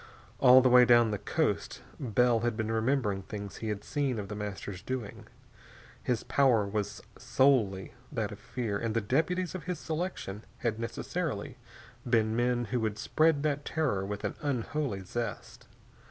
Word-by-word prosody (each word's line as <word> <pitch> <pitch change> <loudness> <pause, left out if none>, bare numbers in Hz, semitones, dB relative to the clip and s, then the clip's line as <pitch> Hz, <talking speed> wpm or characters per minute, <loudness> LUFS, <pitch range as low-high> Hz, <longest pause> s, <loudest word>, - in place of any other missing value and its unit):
All 130 0 +8
the 130 - +5
way 125 0 +8
down 120 -2 +5
the 105 - -2
coast 105 - -1 0.2
Bell 120 -1 +2
had 120 -1 -1
been 110 -1 -1
remembering 110 -3 +1
things 100 0 -7
he 110 - -4
had 105 -1 -3
seen 140 -5 -1
of 100 -2 -5
The 105 - -4
Master's 100 -2 -5
doing. 120 -1 -5 0.7
His 120 -3 -1
power 125 -7 +3
was 105 0 -3 0.2
solely 110 -9 +2 0.2
that - - -2
of - - -9
fear, 110 -5 -3
and 115 -1 -2
the 115 - +2
deputies 165 - 0
of 185 - -6
his 180 -2 -2
selection 155 - -4
had 115 -2 -2
necessarily 115 0 -4 0.4
been 110 -2 +2
men 120 0 +1
who 125 - +2
would 110 -2 -1
spread 155 +5 +2
that 145 -1 0
terror 140 -14 0
with 100 +1 -5
an - - -1
unholy 140 -4 -2
zest. 115 +3 -5
115 Hz, 165 wpm, -30 LUFS, 105-135 Hz, 0.7 s, All